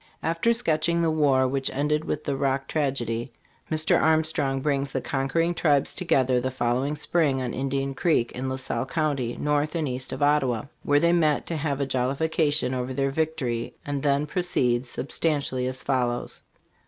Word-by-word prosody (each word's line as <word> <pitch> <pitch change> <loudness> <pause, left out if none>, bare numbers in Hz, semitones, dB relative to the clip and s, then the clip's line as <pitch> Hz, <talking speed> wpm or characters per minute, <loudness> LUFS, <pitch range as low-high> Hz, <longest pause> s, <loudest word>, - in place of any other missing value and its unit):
After 165 +8 +1
sketching 170 -7 +1
the 165 - +2
war 140 -4 +3
which 135 +1 -1
ended 150 +3 0
with 150 - -3
the 140 - -1
Rock 135 0 0
tragedy, 130 -5 -1 0.4
Mr. 155 0 +2
Armstrong 155 -4 +2
brings 140 0 0
the 135 - -2
conquering 140 +7 0
tribes 145 -5 +2
together 130 -8 +2
the 130 - -1
following 130 +3 0
spring 150 -3 +1
on 125 -2 -3
Indian 135 +1 -2
Creek, 135 -4 +1
in 130 +1 -4
La 130 - -2
Salle 130 -1 -2
county, 140 -6 -1
north 150 +2 0
and 160 -3 0
east 130 0 -4
of - - -2
Ottawa, 135 -6 +2 0.2
where 145 0 +3
they 170 +2 +3
met 155 -4 +2
to 170 - -3
have 145 -2 -2
a 140 - +1
jollification 140 +2 0
over 130 0 -3
their 135 0 0
victory, 135 -6 -2
and 145 -1 -2
then 140 0 +2
proceeds 130 -8 0
sub 135 - -5
stantially 140 -5 0
as 130 0 -5
follows: 125 -3 -1
"On. - - -40
140 Hz, 180 wpm, -25 LUFS, 130-155 Hz, 0.4 s, war